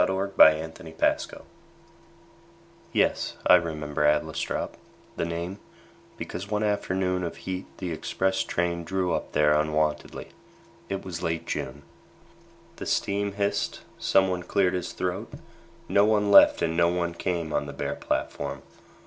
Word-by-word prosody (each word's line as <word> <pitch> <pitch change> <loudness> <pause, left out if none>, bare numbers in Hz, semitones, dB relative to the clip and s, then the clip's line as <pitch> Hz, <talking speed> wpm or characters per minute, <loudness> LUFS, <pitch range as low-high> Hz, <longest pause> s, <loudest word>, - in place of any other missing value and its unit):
Edward 95 +1 -1
Thomas 80 +2 +5 0.2
Adlestrop - - 0 1.5
YES, - - +1
I - - +7
remember 75 -4 +1
Adlestrop 75 0 0 0.4
The - - -1
name 85 +4 -4 0.6
because 90 +3 -6
one 105 0 0
afternoon 95 -3 0
Of 85 - -4
heat 95 0 -4
the 90 -2 -4
express 95 +4 -1
train 85 0 -1
drew 90 +1 -1
up - - -3
there 75 0 +4
Unwontedly. 75 0 0 0.6
It 95 -1 -4
was 90 -3 -5
late 80 0 -2
June. 70 +2 -4 0.9
The - - -6
steam 100 0 0
hissed. 100 0 -1 0.2
Someone 95 -2 +2
cleared 90 +1 +1
his 90 -1 -3
throat. 90 +5 -3 0.5
No 100 +2 +4
one 105 -1 +2
left - - +7
and 80 - 0
no 85 0 +4
one 85 -1 -1
came 85 -2 -2
On - - 0
the - - -5
bare - - -3
platform. 70 -2 -3
90 Hz, 135 wpm, -26 LUFS, 80-95 Hz, 1.5 s, I